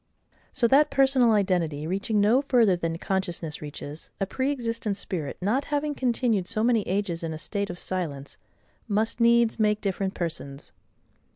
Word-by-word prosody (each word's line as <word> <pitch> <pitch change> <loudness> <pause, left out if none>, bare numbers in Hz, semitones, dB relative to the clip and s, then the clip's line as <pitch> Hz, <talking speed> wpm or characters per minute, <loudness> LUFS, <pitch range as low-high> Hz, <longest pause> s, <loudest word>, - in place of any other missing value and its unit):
So 245 -2 +2
that 280 +5 +5
personal 270 -3 +4
identity, 175 -7 0
reaching 195 +5 -1
no 220 +6 +4
further 240 -8 +3
than 165 -1 -3
consciousness 175 -4 -3
reaches, 150 +1 -8
a 195 - +1
pre 260 +8 -1
existent 230 -6 -2
spirit 170 -7 -4
not 225 +9 0
having 295 0 -1
continued 235 -7 0
so 215 - 0
many 235 -2 +3
ages 190 -3 -1
in 165 -1 -3
a - - -5
state 200 +6 -3
of 175 - -6
silence, 160 -8 -4 0.5
must 220 +2 0
needs 235 -1 +4
make 210 -1 +2
different 195 -1 -2
persons. 155 -5 -5
205 Hz, 160 wpm, -26 LUFS, 175-235 Hz, 0.5 s, that